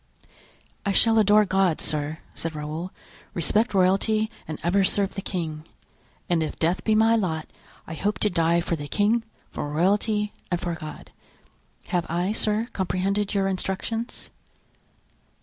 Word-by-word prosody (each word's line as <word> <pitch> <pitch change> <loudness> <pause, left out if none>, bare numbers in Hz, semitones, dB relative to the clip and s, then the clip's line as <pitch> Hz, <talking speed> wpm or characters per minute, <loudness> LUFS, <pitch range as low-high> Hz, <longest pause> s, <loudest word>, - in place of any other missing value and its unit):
"I 200 - 0
shall 225 +2 +5
adore 210 0 +5
God, 190 -4 +2
sir," 150 +1 -2 0.2
said 165 -1 -4
Raoul, 155 +4 -4 0.5
"respect 210 +6 +2
royalty 205 +4 +2 0.2
and 155 -1 -4
ever 190 +4 +3
serve 195 +1 +2
the 195 - -4
king. 160 -6 -4 0.6
And 170 -2 +2
if 155 - -3
death 170 +3 0
be 220 - +2
my 225 +1 +5
lot, 165 -8 -1 0.4
I - - -7
hope 205 +6 -1
to 210 - +3
die 170 0 +3
for 170 - -1
the 145 -2 -6
king, 215 +7 +2 0.3
for 145 - -4
royalty 205 +6 +1 0.2
and 175 - 0
for 175 -1 -2
God. 155 -2 -8 0.8
Have 175 -2 0
I, 175 +4 0
sir, 215 +1 +1
comprehended 195 +2 -1
your 195 -1 +2
instructions?" 195 +5 -3
190 Hz, 150 wpm, -25 LUFS, 165-210 Hz, 0.8 s, shall